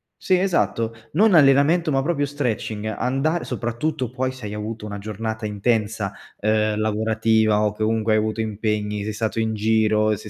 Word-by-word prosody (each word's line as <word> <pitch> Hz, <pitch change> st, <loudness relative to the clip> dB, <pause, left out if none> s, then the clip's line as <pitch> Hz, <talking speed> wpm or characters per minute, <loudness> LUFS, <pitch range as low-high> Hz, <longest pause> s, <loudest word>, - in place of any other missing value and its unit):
sì 185 Hz, -, +1 dB
esatto, 170 Hz, -11 st, 0 dB, 0.2 s
non 205 Hz, +5 st, +4 dB
allenamento, 155 Hz, +2 st, +5 dB
ma 135 Hz, -1 st, +1 dB
proprio 145 Hz, -2 st, 0 dB
stretching, 120 Hz, -6 st, -3 dB
andare 135 Hz, +9 st, -1 dB
soprattutto 125 Hz, +2 st, -2 dB
poi 130 Hz, +1 st, -1 dB
se 130 Hz, -3 st, -10 dB
hai 105 Hz, -, -5 dB
avuto 105 Hz, +1 st, -5 dB
una 100 Hz, -1 st, -6 dB
giornata 110 Hz, +2 st, -4 dB
intensa, 105 Hz, -1 st, -1 dB, 0.3 s
uhm, 110 Hz, 0 st, +1 dB
lavorativa 110 Hz, 0 st, +2 dB
o 105 Hz, -, +1 dB
che 105 Hz, -, -11 dB
comunque 110 Hz, 0 st, +1 dB
hai 110 Hz, -, +4 dB
avuto 110 Hz, +1 st, -1 dB
impegni, 105 Hz, -1 st, -2 dB
sei 110 Hz, +1 st, -3 dB
stato 110 Hz, +1 st, -2 dB
in 110 Hz, -1 st, 0 dB
giro, 110 Hz, 0 st, +2 dB
sei 105 Hz, +1 st, -10 dB
110 Hz, 170 wpm, -22 LUFS, 105-130 Hz, 0.3 s, allenamento